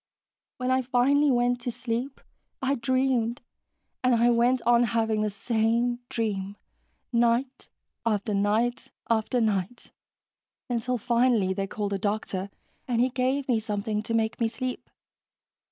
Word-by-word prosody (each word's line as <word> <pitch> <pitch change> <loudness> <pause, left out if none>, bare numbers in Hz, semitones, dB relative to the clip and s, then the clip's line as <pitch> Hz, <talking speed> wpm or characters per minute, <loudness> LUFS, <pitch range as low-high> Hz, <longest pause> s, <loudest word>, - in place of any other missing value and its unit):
When 255 0 -1
I 260 0 +3
finally 265 +4 +3
went 245 -1 +2
to 245 - -2
sleep, 245 +3 -4 0.4
I 270 0 0
dreamed, 255 -2 0 0.6
and 250 -1 +4
I 235 +1 +4
went 240 +2 +3
on 240 0 +4
having 225 -2 +1
the 215 - +1
same 230 +3 0
dream, 200 -3 -2 0.6
night 240 +3 +1 0.3
after 215 -1 0
night 220 +5 0 0.2
after 230 +2 +1
night, 215 0 -1 0.8
until 245 +1 -1
finally 235 -4 +2
they 195 0 -2
called 205 0 -3
a 195 - -1
doctor 200 -1 -2 0.4
and 240 -2 0
he 250 +2 +3
gave 260 +2 0
me 240 -4 +2
something 210 0 -2
to 230 +1 -2
make 225 +1 0
me 230 - +3
sleep." 255 +3 -5
235 Hz, 135 wpm, -27 LUFS, 215-250 Hz, 0.8 s, and